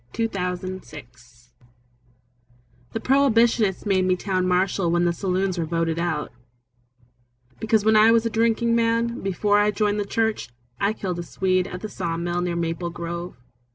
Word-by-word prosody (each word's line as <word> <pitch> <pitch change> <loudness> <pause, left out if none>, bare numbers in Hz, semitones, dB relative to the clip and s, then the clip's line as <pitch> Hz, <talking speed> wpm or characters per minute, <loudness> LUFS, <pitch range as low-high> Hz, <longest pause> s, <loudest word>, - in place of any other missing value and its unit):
The 230 0 0
Town 180 -4 -3
Marshal 185 -6 -7 1.9
The - - -2
Prohibitionists 230 -7 +2
made 190 -2 +2
me 185 0 +2
Town 185 -1 -1
Marshal 180 0 +1
When 175 +1 +2
the 170 - +2
saloons 185 0 -1
were 165 - 0
voted 165 0 -1
out, 165 -3 -2 1.3
Because 220 -1 +1
when 220 0 +4
I 215 +1 +7
was 230 0 +4
a - - +1
drinking 230 +1 +2
man, 230 +1 0
Before 205 +2 +1
I 205 0 +3
joined 210 0 0
the 205 - -1
church, 220 - -1 0.3
I 200 +2 +1
killed 185 -5 -4
a - - -3
Swede 185 +1 0
At 180 -1 -7
the 215 - -4
saw 165 -4 -3
mill 175 +1 -2
near 175 -1 -2
Maple 170 +1 -2
Grove. 170 +1 -6
190 Hz, 165 wpm, -23 LUFS, 175-220 Hz, 1.9 s, I